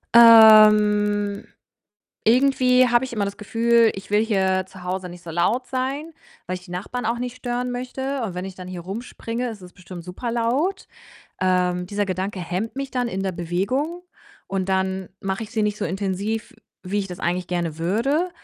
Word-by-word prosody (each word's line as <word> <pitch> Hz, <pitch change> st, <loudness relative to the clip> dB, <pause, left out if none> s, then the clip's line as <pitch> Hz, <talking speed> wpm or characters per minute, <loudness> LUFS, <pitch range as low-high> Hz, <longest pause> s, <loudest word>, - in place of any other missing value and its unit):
Ähm, 210 Hz, -3 st, +7 dB, 0.8 s
irgendwie 255 Hz, +1 st, +4 dB
habe 240 Hz, +1 st, +3 dB
ich 250 Hz, -, -8 dB
immer 205 Hz, -3 st, 0 dB
das 200 Hz, 0 st, -5 dB
Gefühl, 230 Hz, +1 st, +3 dB
ich 195 Hz, +1 st, -9 dB
will 210 Hz, +1 st, +4 dB
hier 190 Hz, -3 st, +1 dB
zu 185 Hz, -1 st, -13 dB
Hause 180 Hz, 0 st, -3 dB
nicht 175 Hz, 0 st, -12 dB
so 165 Hz, -, -7 dB
laut 215 Hz, +10 st, +1 dB
sein, 275 Hz, +5 st, -3 dB, 0.3 s
weil 185 Hz, -, -2 dB
ich 180 Hz, +1 st, -10 dB
die 175 Hz, -, -12 dB
Nachbarn 220 Hz, +7 st, -4 dB
auch 235 Hz, +1 st, 0 dB
nicht 250 Hz, 0 st, -5 dB
stören 245 Hz, 0 st, -3 dB
möchte, 265 Hz, +2 st, -4 dB
und 195 Hz, -5 st, -4 dB
wenn 180 Hz, +1 st, -4 dB
ich 190 Hz, -1 st, -8 dB
dann 185 Hz, -1 st, -9 dB
hier 180 Hz, -2 st, -6 dB
rumspringe, 230 Hz, +4 st, -5 dB
ist 210 Hz, -4 st, -9 dB
es 180 Hz, 0 st, -13 dB
bestimmt 180 Hz, -2 st, -10 dB
super 205 Hz, +7 st, -5 dB
laut. 260 Hz, +12 st, 0 dB, 0.5 s
Ähm, 180 Hz, -1 st, +1 dB
dieser 205 Hz, +1 st, -1 dB
Gedanke 190 Hz, +1 st, -3 dB
hemmt 185 Hz, +7 st, -3 dB
mich 275 Hz, -1 st, -4 dB
dann 245 Hz, -1 st, -1 dB
in 195 Hz, -1 st, -3 dB
der 190 Hz, -1 st, -1 dB
Bewegung, 200 Hz, -, -2 dB, 0.5 s
und 195 Hz, -1 st, -2 dB
dann 190 Hz, 0 st, -1 dB
mache 195 Hz, +1 st, -3 dB
ich 215 Hz, -, -8 dB
sie 220 Hz, -1 st, -1 dB
nicht 210 Hz, 0 st, 0 dB
so -, -, -3 dB
intensiv, 195 Hz, +4 st, -3 dB, 0.3 s
wie 200 Hz, +2 st, -2 dB
ich 195 Hz, -, -5 dB
das 180 Hz, 0 st, -7 dB
eigentlich 180 Hz, +1 st, -1 dB
gerne 170 Hz, -3 st, -2 dB
würde. 255 Hz, -, 0 dB
205 Hz, 190 wpm, -23 LUFS, 185-240 Hz, 0.8 s, Ähm